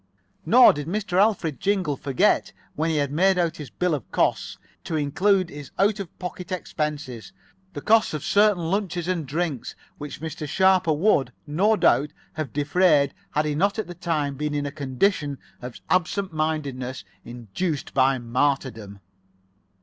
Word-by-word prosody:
Nor 250 +1 +8
did 145 0 -5
Mr. 190 0 -1
Alfred 195 - +1
Jingle 190 -7 0
forget, 135 -1 +1 0.2
when 160 +2 -1
he 150 -3 +1
made 190 +4 +3
out 170 -2 0
his 150 -4 -8
bill 180 +7 -1
of 140 -6 -5
costs, - - 0 0.3
to 165 - -4
include 180 +5 +1
in 145 - -9
his 145 -2 -9
out 205 +2 +2
of 190 -4 -8
pocket 180 0 -7
expenses, 150 - -4 0.4
the 145 - -6
cost 220 -3 +3
of 150 - -5
certain 190 -2 +2
luncheons 180 -4 -2
and 170 -5 -2
drinks 155 -2 -3 0.2
which 145 -1 -7
Mr. 155 -1 -6
Sharper 190 -2 +3
would, 150 -3 +2
no 190 +9 +2
doubt, 150 -7 +2 0.2
have 155 -6 -4
defrayed 145 -1 +3 0.2
had 150 +1 0
he 150 - -1
not 200 +7 +1
at 220 - -2
that 175 0 -11
time 150 -5 -1
been 150 +2 -3
in 145 0 -1
a 140 - -3
condition 145 +1 -1 0.2
of 125 -1 -8
absent 185 +1 0
mindedness 140 -6 -3 0.2
induced 125 - -4
by 135 -1 +3
martyrdom. 120 -5 -2
155 Hz, 160 wpm, -24 LUFS, 140-185 Hz, 0.4 s, Nor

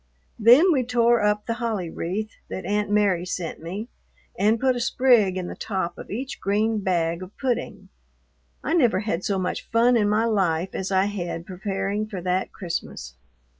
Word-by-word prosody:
Then 250 - +7
we 265 -5 +2
tore 235 -1 +3
up 210 0 +1
the 230 - -1
holly 210 -8 -2
wreath 210 +6 -3 0.2
that 185 - -5
Aunt 205 +2 0
Mary 205 -4 +2
sent 180 -3 -4
me, 190 +7 -5 0.5
and 215 +4 +2
put 260 0 +2
a - - -2
sprig 235 -6 +3
in 185 - -3
the - - -6
top 190 -5 -3
of - - -10
each 255 +6 -5
green 215 +3 +1
bag 170 -3 0
of 185 +2 -10
pudding. 255 -3 -3 0.7
I - - -1
never 245 - +3
had 195 -4 -2
so 200 - 0
much 185 -1 -3
fun 235 +2 +4
in 210 -3 +3
my 215 +2 +2
life 190 -5 +1
as 190 0 -3
I 190 0 +3
had 175 -4 -4
preparing 195 +2 -3
for 200 -4 -6
that 180 +1 -1
Christmas. 170 - -5
205 Hz, 180 wpm, -24 LUFS, 185-230 Hz, 0.7 s, Then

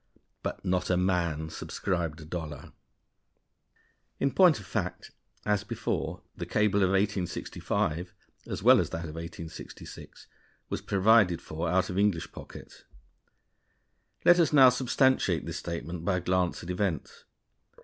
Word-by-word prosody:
But - - -5
not 90 0 0
a 90 - +3
man 85 -4 0
subscribed 85 -5 -3
a - - -10
dollar. 80 -3 -6 1.5
In 140 - +1
point 170 - +5
of 100 - -11
fact, 85 - -4 0.3
as 105 -1 +1
before, 105 - -3
the - - -6
cable 105 -1 +2
of 95 - +4
1865 95 -3 -1 0.4
as - - -5
well - - +7
as - - 0
that 85 0 -4
of 75 - -7
1866 85 0 -9 0.4
was - - -3
provided 100 -3 +4
for 80 +2 -4
out 95 +2 +1
of 90 - -1
English 100 -5 +1
pockets. - - -12 1.4
Let 175 0 +7
us 165 - +4
now 135 -4 +8
substantiate 130 +1 +2
this - - -4
statement 85 0 -5
by 90 +1 +1
a - - 0
glance 90 0 0
at 85 - -4
events. 90 -5 -3
90 Hz, 140 wpm, -29 LUFS, 85-105 Hz, 1.5 s, now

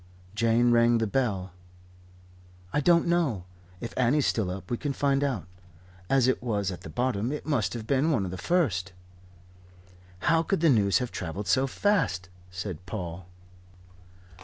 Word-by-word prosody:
Jane 115 +2 +3
rang 120 0 +4
the 115 - +1
bell. 100 -6 -1 1.2
"I - - +2
don't 170 +2 +4
know. 165 - +1 0.4
If 115 - -6
Annie's 130 +3 +2
still 105 -5 0
up, 95 +2 -7
we 120 - 0
can 145 +2 -2
find 140 0 +1
out. 120 - -1 0.6
As 135 -2 +4
it 130 - +1
was 105 -5 -1
at 90 - -8
the - - -9
bottom, 120 - -1
it 150 - -5
must 120 - 0
have 115 -2 -5
been 140 +6 +2
one 115 -11 +1
of 90 - -5
the 95 - -5
first." 105 - 0 1.3
"How 165 0 +4
could 165 +1 -1
the 165 - +5
news 100 -6 +3
have 125 -1 -3
travelled 95 +3 -5
so 135 +1 +3
fast?" 135 - 0 0.2
said 90 -1 -6
Paul. 90 -3 -6
115 Hz, 160 wpm, -27 LUFS, 95-140 Hz, 1.3 s, the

